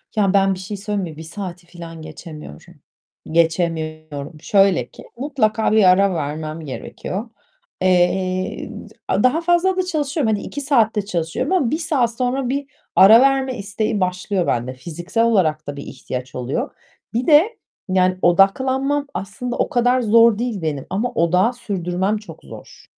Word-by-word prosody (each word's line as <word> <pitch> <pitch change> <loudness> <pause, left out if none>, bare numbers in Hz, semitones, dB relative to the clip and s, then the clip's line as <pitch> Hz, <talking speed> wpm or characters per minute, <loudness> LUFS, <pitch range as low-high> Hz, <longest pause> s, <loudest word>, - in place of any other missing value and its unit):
Ya 200 -2 +2
ben 195 -1 +4
bir 185 - -7
şey 200 +2 -6
söyleyeyim 205 0 -3
mi? 155 - -14
1 160 - -8
saati 175 0 -8
filan 165 -2 -10
geçemiyorum. 155 - -11 0.6
Geçemiyorum. 160 -2 -1
Şöyle 195 - +3
ki; - - -14
mutlaka 230 -6 0
bir 215 -1 +5
ara 190 +1 +5
vermem 155 +1 -4
gerekiyor. 185 - -6 0.5
Eee, 185 0 +1 0.2
d - - -2
daha 285 +7 +3
fazla 350 +2 +2
da 370 - +2
çalışıyorum. 295 -7 -1
Hani, 205 - -2
2 285 - -6
saatte 225 -7 +2
çalışıyorum 170 - -2
ama 285 -11 +2
1 310 - +1
saat 290 -8 0
sonra 255 0 -1
bir 280 +2 -1 0.3
ara 220 +5 +8
verme 270 -1 +2
isteği 210 +2 -2
başlıyor 185 0 -1
bende. 125 +2 -1
Fiziksel 175 - -3
olarak 160 -9 +1
da 145 - -4
bir 140 - -6
ihtiyaç 130 -1 -7
oluyor. 135 - -3 0.4
Bir 245 +5 -1
de 335 +10 +5 0.3
yani 185 0 +2
odaklanmam 260 +10 +2
aslında 240 +6 -5
o - - 0
kadar 245 +1 +2
zor 230 -1 +5
değil 235 -5 -2
benim 150 -4 -3
ama 215 +6 -1
odağı 180 +8 +2
sürdürmem 190 -3 -2
çok 210 0 -12
zor. - - -13
195 Hz, 155 wpm, -20 LUFS, 170-245 Hz, 0.6 s, ara